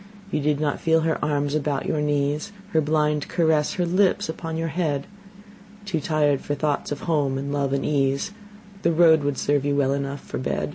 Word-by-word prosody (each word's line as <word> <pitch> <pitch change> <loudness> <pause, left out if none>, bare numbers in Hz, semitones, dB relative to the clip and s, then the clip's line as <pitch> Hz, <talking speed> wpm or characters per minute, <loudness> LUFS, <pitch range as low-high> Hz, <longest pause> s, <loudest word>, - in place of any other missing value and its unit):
You - - 0
did 145 0 +1
not 150 -2 -1
feel 160 0 +3
her 160 0 -1
arms 145 -1 0
about 145 -2 -1
your 150 - 0
knees, 145 +4 0 0.2
Her 160 -3 +3
blind 150 -1 +1
caress, 160 -3 +2
her 180 - 0
lips 185 0 +2
upon 160 0 -4
your 165 0 -1
head: 150 -4 -1 0.8
Too 190 -5 -1
tired 145 -2 +1
for 145 - -2
thoughts 145 0 -1
of 145 - -4
home 145 -5 0
and 140 +1 -3
love 140 -2 0
and 140 0 0
ease, 140 +3 +1 0.5
The 170 - +2
road 160 -1 +5
would 145 -2 -1
serve 145 -1 +1
you 145 0 0
well 140 -1 +2
enough 140 0 -3
for - - -6
bed. 130 - -2
150 Hz, 200 wpm, -24 LUFS, 140-160 Hz, 0.8 s, road